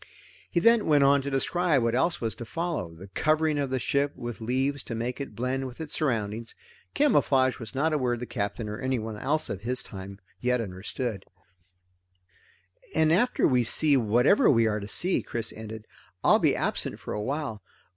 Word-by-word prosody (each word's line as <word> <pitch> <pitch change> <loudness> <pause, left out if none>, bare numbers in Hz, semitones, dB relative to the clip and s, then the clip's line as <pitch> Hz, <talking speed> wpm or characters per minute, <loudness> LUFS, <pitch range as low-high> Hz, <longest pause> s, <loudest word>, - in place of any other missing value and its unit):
He 170 - +1
then 230 +4 +4
went 145 -3 +5
on 140 0 +5
to 140 - -4
describe 145 +1 +1
what 115 0 +1
else 170 +8 +1
was 115 -2 -2
to 115 - -8
follow 165 - -3
the 95 +4 -12
covering 155 +6 +1
of 140 -2 -1
the 130 - -1
ship 140 +3 0
with 120 -2 -7
leaves 130 +4 0
to 115 - -5
make 120 +4 -3
it 140 - -7
blend 130 +2 -2
with 125 - -11
its 160 -2 -6
surroundings. 115 -5 -2 0.4
Camouflage 135 - +3
was 115 +1 -9
not 155 +4 +1
a 150 - +1
word 120 -2 0
the 125 - -4
Captain, 105 -1 -3
or 105 0 -5
anyone 115 -4 -2
else 150 +8 -1
of 95 - -5
his 125 +3 0
time, 95 0 -9 0.2
yet 125 0 +1
understood. 105 +1 -4 1.7
"After 165 +10 +3
we 125 -2 +3
see 145 +5 +4
whatever 125 - +4
we 115 -3 +4
are 105 -1 0
to 100 - -7
see," 180 - +3
Chris 115 -1 -3
ended, 110 0 -8 0.4
"I'll - - +5
be - - +3
absent - - -2
for - - -6
a 105 - -3
while. 135 -3 -3
125 Hz, 185 wpm, -27 LUFS, 110-145 Hz, 1.7 s, went